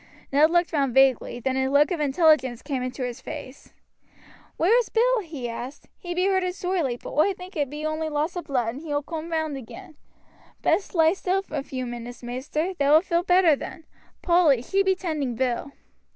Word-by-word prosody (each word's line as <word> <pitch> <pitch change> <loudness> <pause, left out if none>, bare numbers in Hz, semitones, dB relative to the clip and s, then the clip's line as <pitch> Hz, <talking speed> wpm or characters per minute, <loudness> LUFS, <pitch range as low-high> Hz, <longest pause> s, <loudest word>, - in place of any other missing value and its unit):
Ned 295 +3 +5
looked 345 0 +1
round 275 -5 0
vaguely, 265 -2 +3
then 260 +2 -1
a 265 0 +1
look 290 +5 +4
of 345 - -1
intelligence 285 -4 +2
came 275 -3 -3
into 255 +1 -4
his 245 +1 -5
face. 285 -2 -9 0.9
"Where 370 +8 +4
is 480 - -2
Bill?" - - +3
he 310 - -6
asked. 245 +4 -7
"He 350 -1 -6
be 365 +1 +1
hurted 375 -2 +1
sorely, 355 -10 -1
but - - -9
oi 310 +7 +3
think 365 +1 -11
it 290 -4 -1
be 300 +2 -6
only 310 0 -2
loss 305 +4 -1
o' 355 - -2
blood, 250 -7 -1
and 255 +5 -6
he 325 - -10
will 290 0 0
coom 325 +1 -6
round 315 -3 -1
again; 315 +6 -11 0.7
best 390 - +1
lie 325 0 +5
still 385 0 -1
a 295 - -2
few 260 -2 -5
minutes, 240 0 -8
maister, 280 +9 -3
thou 285 -4 +2
wilt 320 +4 +5
feel 340 -2 +1
better 355 -3 +4
then; 320 +3 -9 0.4
Polly, 335 -8 +4
she 390 +9 +1
be 380 -1 +2
tending 305 -9 -3
Bill." 255 +3 -1
305 Hz, 200 wpm, -25 LUFS, 265-355 Hz, 0.9 s, Ned